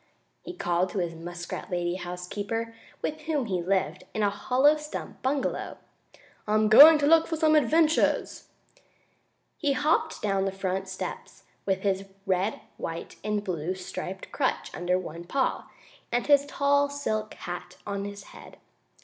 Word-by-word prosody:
he - - -7
called 175 - 0
to - - -6
his 175 -3 -1
muskrat 175 +1 -7
lady 175 -1 -1
housekeeper, 195 +6 -4 0.3
with 310 0 -3
whom 295 -5 0
he 185 -5 -1
lived 185 -2 0
in 215 - 0
a 200 - +3
hollow 260 +8 +3
stump 300 0 -7
bungalow. 270 +2 -1 0.7
"I'm 215 0 +3
going 300 +8 +10
to 290 - +1
look 325 +2 +5
for 325 - -2
some 315 -1 +3
wonderful 305 -1 +4
adventures!" 315 +1 0 1.1
He 290 -3 +1
hopped 310 +3 +1
down 195 -2 0
the 195 - 0
front 190 0 -3
steps, 190 0 -7 0.2
with 190 -1 +1
his 195 -1 0 0.2
red, 190 +2 0 0.2
white 165 0 -6
and 210 0 -1
blue 180 -1 -2
striped 185 +1 -7
crutch 270 - -1
under 180 +1 0
one 170 -2 -7
paw, 265 +8 -1 0.4
and 240 0 0
his 285 -1 +4
tall, 285 0 +2
silk 215 -7 -3
hat 175 +1 -7
on 200 -1 -3
his 200 0 -7
head. - - -13
205 Hz, 155 wpm, -27 LUFS, 185-285 Hz, 1.1 s, going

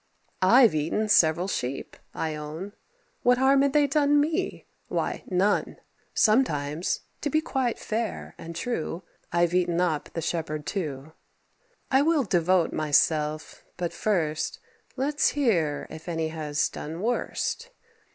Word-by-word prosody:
I've 230 +4 +6
eaten 160 +8 0
several 170 -1 +4
sheep, 135 -8 -4 0.2
I 160 -1 -3
own. 155 +6 -6 0.5
What 245 0 +4
harm 270 +1 +4
had 280 -1 +2
they 295 -1 +5
done 290 +1 +3
me? 320 +5 -1 0.2
why, - - -2
none. 195 +2 +1 0.4
Sometimes 160 - +2 0.2
to 290 - -1
be 310 - +2
quite 265 -6 -1
fair 225 0 -3
and 165 0 -8
true 175 -3 -3 0.3
I've 175 0 +2
eaten 175 -1 +1
up 165 -5 0
the - - -3
shepherd 155 -3 -3
too. 155 -5 -4 0.8
I 265 +1 +5
will 310 -1 +3
devote 180 -3 +2
myself; 155 0 +1
but, 175 -1 -3
first, 160 -7 -1 0.4
Let's 290 +3 +1
hear 170 - +1
if 160 +2 -8
any 165 -1 -1
has 155 -2 -1
done 160 +3 -7
worst. 245 - -2
180 Hz, 130 wpm, -26 LUFS, 155-250 Hz, 0.8 s, I've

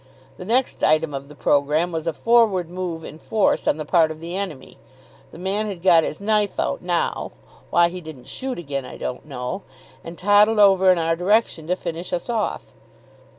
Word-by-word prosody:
The 180 - -8
next 245 +5 0
item 155 -1 +3
of 140 0 -5
the 150 - -13
programme 150 +5 +1
was 165 0 -4
a 165 - 0
forward 215 -7 +2
move 175 -3 -4
in 155 - -10
force 215 +3 0
on - - +2
the 155 - -5
part 165 -3 +3
of 155 0 -7
the 170 +2 -6
enemy. 190 -8 -6 0.5
The - - -12
man 195 +4 -1
had 185 -4 -7
got 170 -4 +6
his 155 - -4
knife 210 0 0
out - - -1
now 175 -1 -2 0.4
why 170 0 +4
he 180 +1 -7
didn't 155 -7 -11
shoot 255 - -5
again 140 -5 -4
I 125 - -9
don't 125 - -6
know 130 +7 -5 0.4
and 165 +1 -9
toddled 205 +3 +4
over 190 -2 +6
in 180 - +3
our 165 0 +1
direction 180 -3 +1
to 180 - +1
finish 170 0 -6
us 180 +7 -2
off. 220 -3 -3
175 Hz, 195 wpm, -22 LUFS, 160-200 Hz, 0.5 s, got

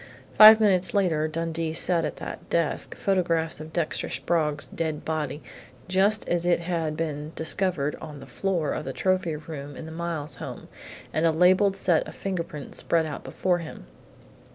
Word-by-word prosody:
Five 220 0 +10
minutes 195 -3 +2
later 165 -6 +2
Dundee 165 0 -3
sat 165 0 +3
at - - -4
that - - -8
desk, 165 -2 -1
photographs 170 -5 0
of 155 +1 -9
Dexter 165 -1 -2
Sprague's 150 -4 0
dead 160 -2 -4
body, 150 -2 -3 0.4
just 195 +3 +2
as 175 -1 +1
it 175 -1 +2
had 165 -3 -2
been 155 -1 -4
discovered 160 -2 -1
on 150 -3 -8
the - - -10
floor 180 -6 -2
of - - -3
the 135 - -4
trophy 185 -2 0
room 145 -2 -8
in - - -8
the 160 - -8
Miles 165 -3 -4
home, - - -8 0.4
and 160 +2 +2
a - - +4
labelled 185 +4 +4
set 175 -4 +1
of - - -10
fingerprints 170 -6 -3
spread 165 -1 +1
out 150 -2 -6
before 180 -2 0
him. 160 - -9
165 Hz, 170 wpm, -26 LUFS, 155-180 Hz, 0.4 s, Five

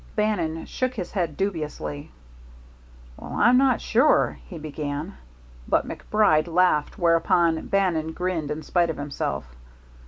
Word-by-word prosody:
Bannon 175 -7 -1
shook 255 0 -2
his 185 -6 -5
head 170 -7 -2
dubiously. 150 - -4 1.1
"Well, - - -9
I'm 240 +3 +5
not 265 -3 +3
sure 250 +6 +3
" - - -20
he 180 - -7
began. 150 +2 -5 0.5
But - - +2
MacBride 175 -7 +1
laughed, 170 -2 +2
whereupon 165 -2 +2
Bannon 170 -5 0
grinned 180 -5 -2
in 150 +1 -4
spite 175 -2 +1
of 160 - -3
himself. 140 - -3
170 Hz, 130 wpm, -24 LUFS, 155-195 Hz, 1.1 s, I'm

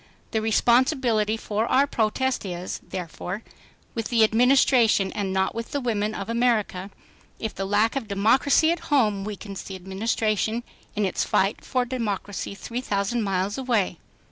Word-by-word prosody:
The 220 - 0
responsibility 235 -1 +2
for 220 +1 -2
our 275 +2 +4
protest 260 +1 0
is, 180 -2 -5
therefore, 180 +3 -6 0.5
with 225 -2 -3
the 230 -2 +3
Administration 230 -3 +4
and 200 -2 -2
not 190 0 +1
with 230 +1 -6
the 285 - 0
women 215 -4 -1
of 195 - -5
America, 225 -5 0 0.5
if 220 - -3
the 195 - -3
lack 210 +4 +2
of 270 -5 -3
democracy 245 +10 +3
at 340 - -1
home 215 -9 +2
weakens 200 -1 -6
the 195 - -8
Administration 215 +4 -1 0.3
in 210 -1 +1
its 190 - 0
fight 195 +3 +1
for 255 -2 0
democracy 205 -5 -3
three 235 +5 -5
thousand 205 +1 -1
miles 195 +2 -1
away." 225 -9 0
220 Hz, 150 wpm, -25 LUFS, 200-240 Hz, 0.5 s, our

